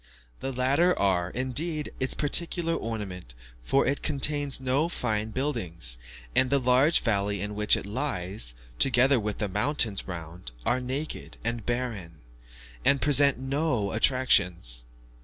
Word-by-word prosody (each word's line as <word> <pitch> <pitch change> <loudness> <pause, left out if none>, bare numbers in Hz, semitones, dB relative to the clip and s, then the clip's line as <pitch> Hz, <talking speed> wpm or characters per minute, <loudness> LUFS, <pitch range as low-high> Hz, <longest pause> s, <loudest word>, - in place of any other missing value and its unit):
The 135 - -4
latter 140 +8 +2
are, 90 -3 +1
indeed, 145 - -1
its 130 - +1
peculiar 165 +2 +1
ornament, 95 - -6 0.3
for 135 - +1
it 140 +2 -1
contains 145 -1 +1
no 135 +5 0
fine 110 -8 -2
buildings; 85 - -2 0.4
and 130 - +3
the 140 - +3
large 130 +5 +3
valley 100 -2 0
in 105 +2 -4
which 105 0 +3
it - - -6
lies, 100 - -1 0.2
together 130 0 +4
with 105 -1 -3
the 105 - -2
mountains 105 +1 0
round, 85 -4 -8
are 125 +1 +1
naked 135 +5 -5
and 115 0 -3
barren, 115 -10 -3 0.7
and 140 - +4
present 140 -1 +4
no 135 -5 -1
attractions. 90 - +2
125 Hz, 135 wpm, -27 LUFS, 100-140 Hz, 0.7 s, together